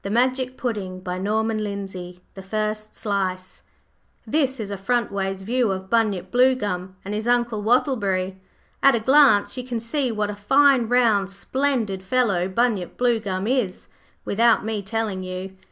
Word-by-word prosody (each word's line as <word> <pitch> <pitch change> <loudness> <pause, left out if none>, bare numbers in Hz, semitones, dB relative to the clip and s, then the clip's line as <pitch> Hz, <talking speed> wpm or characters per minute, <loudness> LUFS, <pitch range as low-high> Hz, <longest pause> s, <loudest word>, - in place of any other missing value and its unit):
11501 205 -5 -2 0.2
First 215 +2 -3
Slice 185 -3 -3 0.6
This 265 +1 0
is 205 -2 -4
a - - -2
frontways 195 -3 -1
view 240 +2 +1
of 190 0 -5
Bunyip 220 -5 +1
Bluegum 210 -8 +1
and 200 - -4
his 215 +2 -3
Uncle 240 -3 +1
Wattleberry. 205 -6 +1 0.4
At 275 -2 +6
a - - +1
glance 260 -3 +4
you 250 - -3
can 245 -2 -3
see 250 +3 -1
what 210 -1 -1
a - - -7
fine, 270 +4 +4
round, 225 -5 +3
splendid 220 -1 -1
fellow 195 -4 +1
Bunyip 205 -2 -1
Bluegum 215 -6 0
is, 240 -7 -1 0.4
without 230 +1 +3
me 220 -2 -2
telling 210 -1 -3
you. 185 +1 -6
215 Hz, 130 wpm, -23 LUFS, 195-245 Hz, 0.6 s, At